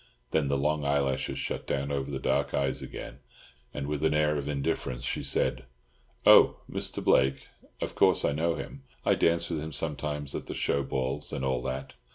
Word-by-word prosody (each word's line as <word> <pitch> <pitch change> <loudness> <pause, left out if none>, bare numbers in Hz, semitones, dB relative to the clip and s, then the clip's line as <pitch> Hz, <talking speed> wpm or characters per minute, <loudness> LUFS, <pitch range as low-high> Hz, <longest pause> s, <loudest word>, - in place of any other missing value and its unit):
Then 80 -3 +2
the 70 0 +1
long 75 +2 0
eyelashes 70 -2 0
shut 70 - -3
down 70 +1 -1
over 70 -1 -2
the 70 - -2
dark 65 - 0
eyes 70 -2 0
again, - - -8 0.5
and 70 - -4
with 75 +1 -2
an 80 -1 +3
air 75 0 +3
of 70 0 -3
indifference 70 -3 -2
she - - -1
said— 65 0 -1 0.6
"Oh - - +8
Mr. - - -3
Blake? 65 0 +3 0.3
Of - - -2
course - - +4
I - - +2
know 80 +3 0
him. 140 - -7 0.2
I 100 - +5
dance 85 -2 +2
with 80 - -1
him 80 +1 -5
sometimes 75 -2 -3
at - - -5
the - - -5
show 70 - +1
balls, 65 +2 -2
and 65 - -2
all 65 -2 0
that. 65 +1 -4
70 Hz, 195 wpm, -29 LUFS, 65-75 Hz, 0.6 s, Oh